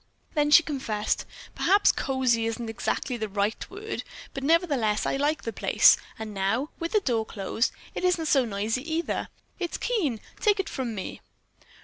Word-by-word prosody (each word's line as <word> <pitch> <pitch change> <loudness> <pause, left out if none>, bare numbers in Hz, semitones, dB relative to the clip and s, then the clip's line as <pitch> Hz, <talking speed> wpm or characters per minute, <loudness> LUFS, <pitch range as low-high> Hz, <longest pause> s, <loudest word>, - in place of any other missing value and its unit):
Then 295 -2 +2
she 335 +3 +8
confessed, 245 -9 -2 0.3
"Perhaps 405 +2 +4
cozy 255 -4 +1
isn't 225 0 -3
exactly 245 +2 -2
the 220 -2 -3
right 205 +2 -1
word, 425 +3 -5 0.3
but 270 - -5
nevertheless 280 - +2
I - - 0
like 295 +3 0
the 230 - -4
place, - - +6 0.2
and 220 -1 -6
now, 205 +9 0
with 335 +3 -3
the 425 - +4
door 235 - +1
closed, 220 +2 -1 0.2
it - - -4
isn't 355 -3 +2
so 275 -3 +4
noisy 225 +8 -2
either. 335 - -1 0.3
It's 350 -2 -2
keen, 325 - 0 0.2
take 415 -2 +3
it 385 - -1
from 245 -4 -3
me." 190 - -6
260 Hz, 165 wpm, -27 LUFS, 220-325 Hz, 0.3 s, she